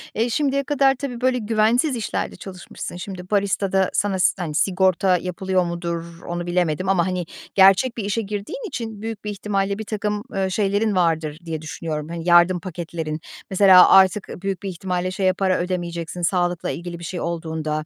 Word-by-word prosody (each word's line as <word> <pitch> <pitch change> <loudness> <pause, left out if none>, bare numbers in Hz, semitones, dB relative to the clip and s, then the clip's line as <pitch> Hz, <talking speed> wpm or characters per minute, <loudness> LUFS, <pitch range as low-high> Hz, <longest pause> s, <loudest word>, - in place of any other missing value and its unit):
eee, 230 +2 +1
şimdiye 280 +2 +1
kadar 275 -1 +3
tabii, 250 -3 -6
böyle, 255 0 +2
güvensiz 230 +5 +2
işlerde 225 - -3
çalışmışsın. 185 -2 -8
Şimdi 180 0 -8
baristada 195 -2 +1
sana 195 -2 0
si 180 - +4
hani, 160 -4 -4
sigorta 185 +2 +2
yapılıyor 185 +1 -1
mudur, 170 -1 -5
onu 175 0 -3
bilemedim 175 0 0
ama, 190 -2 +2
hani, 180 -1 -2 0.3
gerçek 195 +6 +5
bir 220 - -2
işe 205 +3 -1
girdiğin 210 - -5
için 230 - -6
büyük 225 -1 -5
bir - - -2
ihtimalle 200 -1 -1
birtakım, 210 -1 -3
eee, 190 -1 0
şeylerin 205 +1 +1
vardır 160 -4 +1
diye 160 -2 -4
düşünüyorum, 155 -1 -5
hani, 170 0 -6
yardım 175 +1 +5
paketlerin. 165 -3 -5 0.3
Mesela 190 -1 +7
artık 190 +1 +5
ııı - - -8
büyük 195 -1 -3
bir 195 - -3
ihtimalle 180 0 -3
şeye 190 -1 +1
para 185 -1 +1
ödemeyeceksin, 175 -1 -3
sağlıkla 175 0 0
ilgili 170 0 -5
bir - - -10
şey 175 +2 -4
olduğunda 160 -2 -3
185 Hz, 170 wpm, -22 LUFS, 170-205 Hz, 0.3 s, Mesela